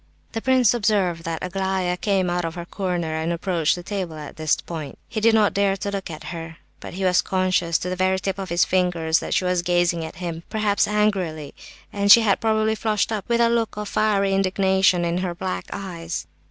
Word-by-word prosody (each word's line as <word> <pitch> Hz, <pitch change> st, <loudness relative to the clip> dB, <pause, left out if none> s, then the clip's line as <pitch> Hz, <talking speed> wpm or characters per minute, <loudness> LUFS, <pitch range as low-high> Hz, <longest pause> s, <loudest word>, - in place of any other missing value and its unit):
The 225 Hz, -, -4 dB
prince 255 Hz, -3 st, +4 dB
observed 200 Hz, -7 st, 0 dB
that 165 Hz, -1 st, -3 dB
Aglaya 190 Hz, -1 st, -1 dB
came 190 Hz, 0 st, 0 dB
out 175 Hz, 0 st, -1 dB
of 165 Hz, 0 st, -4 dB
her 175 Hz, -1 st, -6 dB
corner 175 Hz, -4 st, -3 dB
and 160 Hz, +1 st, -1 dB
approached 170 Hz, -2 st, 0 dB
the 175 Hz, -, -8 dB
table 185 Hz, -4 st, -4 dB
at 150 Hz, -1 st, -9 dB
this 155 Hz, -1 st, +1 dB
point. 155 Hz, -5 st, -7 dB
He 220 Hz, -, -4 dB
did 225 Hz, +1 st, +5 dB
not 215 Hz, -2 st, +3 dB
dare 200 Hz, -1 st, +1 dB
look 200 Hz, -2 st, -3 dB
at 155 Hz, -2 st, -8 dB
her, 165 Hz, 0 st, -7 dB, 0.2 s
but -, -, -9 dB
he 190 Hz, -, -4 dB
was 180 Hz, -1 st, +4 dB
conscious, 185 Hz, -3 st, +1 dB
to -, -, -5 dB
the 185 Hz, -, -2 dB
very 185 Hz, +1 st, +1 dB
tips 195 Hz, 0 st, -3 dB
of 190 Hz, -1 st, -5 dB
his 170 Hz, +1 st, +3 dB
fingers, 175 Hz, -3 st, +1 dB
that -, -, -3 dB
she 185 Hz, -, +1 dB
was 180 Hz, -1 st, +1 dB
gazing 175 Hz, -1 st, +1 dB
at 160 Hz, -, -7 dB
him, 170 Hz, -1 st, -5 dB
perhaps 210 Hz, -2 st, +1 dB
angrily; 190 Hz, -8 st, -1 dB, 0.4 s
and 200 Hz, 0 st, -1 dB
that 200 Hz, -, +6 dB
she 235 Hz, -, +7 dB
had 205 Hz, -3 st, +2 dB
probably 220 Hz, -1 st, +2 dB
flushed 215 Hz, -1 st, 0 dB
up 215 Hz, -1 st, -4 dB
with 235 Hz, 0 st, +2 dB
a 235 Hz, -, +5 dB
look 230 Hz, -3 st, 0 dB
of 210 Hz, 0 st, -4 dB
fiery 200 Hz, -2 st, +1 dB
indignation 190 Hz, -2 st, +2 dB
in 170 Hz, +1 st, 0 dB
her 180 Hz, -2 st, -3 dB
black 185 Hz, +1 st, -4 dB
eyes. 170 Hz, -, -5 dB
185 Hz, 220 wpm, -23 LUFS, 170-200 Hz, 0.4 s, she